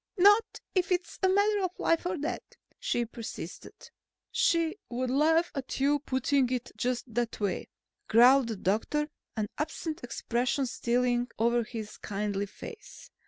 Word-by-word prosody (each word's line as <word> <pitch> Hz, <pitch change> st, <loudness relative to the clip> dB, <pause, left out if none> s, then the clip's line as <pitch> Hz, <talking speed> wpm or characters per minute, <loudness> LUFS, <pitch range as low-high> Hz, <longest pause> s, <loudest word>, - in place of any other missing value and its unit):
"Not 410 Hz, +4 st, +5 dB
if 370 Hz, -1 st, +1 dB
it's 355 Hz, -2 st, -1 dB
a 380 Hz, -, +4 dB
matter 405 Hz, +2 st, +3 dB
of 370 Hz, -1 st, -2 dB
life 330 Hz, +1 st, +2 dB
or 355 Hz, 0 st, -1 dB
death?" 300 Hz, +2 st, -2 dB, 0.4 s
she 240 Hz, -, 0 dB
persisted. 230 Hz, -1 st, -8 dB, 0.4 s
"She 335 Hz, +2 st, +2 dB
would 250 Hz, +1 st, -2 dB
laugh 320 Hz, +5 st, +3 dB
at 275 Hz, -1 st, -4 dB
your 285 Hz, +2 st, +3 dB
putting 260 Hz, -1 st, +1 dB
it 250 Hz, -2 st, -2 dB
just 250 Hz, -1 st, -2 dB
that 240 Hz, 0 st, -1 dB
way," 200 Hz, -3 st, -1 dB, 0.4 s
growled 250 Hz, +3 st, +6 dB
the 225 Hz, -, -2 dB
doctor, 225 Hz, +11 st, 0 dB, 0.3 s
an 215 Hz, -, +1 dB
absent 310 Hz, 0 st, -3 dB
expression 250 Hz, +3 st, -1 dB
stealing 245 Hz, 0 st, +1 dB
over 235 Hz, +1 st, +2 dB
his 220 Hz, -2 st, -7 dB
kindly 205 Hz, 0 st, -2 dB
face. 440 Hz, -, -11 dB
255 Hz, 145 wpm, -29 LUFS, 235-330 Hz, 0.4 s, growled